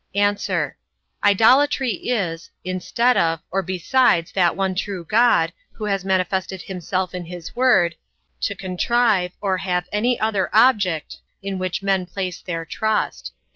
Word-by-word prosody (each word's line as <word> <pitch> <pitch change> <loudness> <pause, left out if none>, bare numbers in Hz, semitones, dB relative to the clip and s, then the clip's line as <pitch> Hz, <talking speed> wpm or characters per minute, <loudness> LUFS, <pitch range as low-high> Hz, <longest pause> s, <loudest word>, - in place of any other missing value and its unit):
A. 205 0 +3 0.9
Idolatry 255 +6 +4 0.2
is, 175 -9 -2
instead 210 +7 +1
of, 165 -1 +2
or 195 +2 +1
besides 185 0 +2
that 175 -3 +2
one 190 -1 0
true 185 -2 -4
God, 235 +6 +3 0.2
who 215 - -6
has 195 -2 -1
manifested 190 0 -1
himself 185 0 -3
in 180 -1 -5
his 175 -1 -9
word, 240 -10 +4 0.5
to 200 - -2
contrive, 190 0 +1
or 190 -2 0
have 180 -2 -1
any 235 +4 +1
other 215 -3 0
object, 205 - +3 0.3
in 195 -1 -3
which 185 +1 -3
men 190 -2 +1
place 185 -1 -4
their 165 -2 -4
trust. 220 +4 -2
190 Hz, 135 wpm, -21 LUFS, 180-215 Hz, 0.9 s, Idolatry